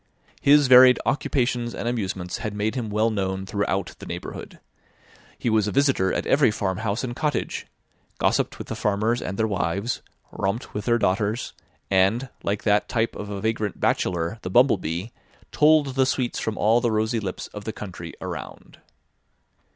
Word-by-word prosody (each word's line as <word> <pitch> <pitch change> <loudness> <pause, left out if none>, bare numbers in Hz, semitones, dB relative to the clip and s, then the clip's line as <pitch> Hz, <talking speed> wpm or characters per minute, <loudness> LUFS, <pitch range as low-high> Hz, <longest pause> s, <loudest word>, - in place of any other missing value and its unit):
His 145 +1 +6
varied 125 0 +8
occupations 125 -4 0
and - - -4
amusements 95 -4 -3
had 110 -2 -4
made 105 +1 -1
him 120 -5 -3
well 110 +2 +1
known 95 -2 -2
throughout 100 -2 -2
the - - -9
neighbourhood. - - -7 0.8
He - - -4
was 110 -2 +3
a - - -1
visitor 135 -9 +2
at - - -2
every 140 -4 +4
farmhouse 100 +2 -2
and 120 -2 -4
cottage; 145 -1 -2 0.5
gossiped - - +1
with - - -7
the - - -3
farmers 110 +4 0
and 95 +2 -4
their 110 - +2
wives; 100 +2 -1 0.3
romped 100 +6 -3
with 105 -1 -4
their 120 0 +3
daughters; 105 +2 0 0.4
and, 100 +7 +2
like 100 +1 -2
that 105 -1 +2
type 115 -1 0
of 105 - -6
a 100 -1 -5
vagrant 110 -2 -2
bachelor, 85 +5 0
the - - -5
bumblebee, 95 - +2 0.4
tolled 150 -2 +4
the 130 0 +2
sweets 125 -2 -1
from 110 -1 -3
all 115 +3 +3
the 120 - +1
rosy 110 +1 0
lips 95 -4 -5
of 105 0 -8
the 110 - -2
country 90 -6 -8
around. - - -8
110 Hz, 165 wpm, -24 LUFS, 100-120 Hz, 0.8 s, varied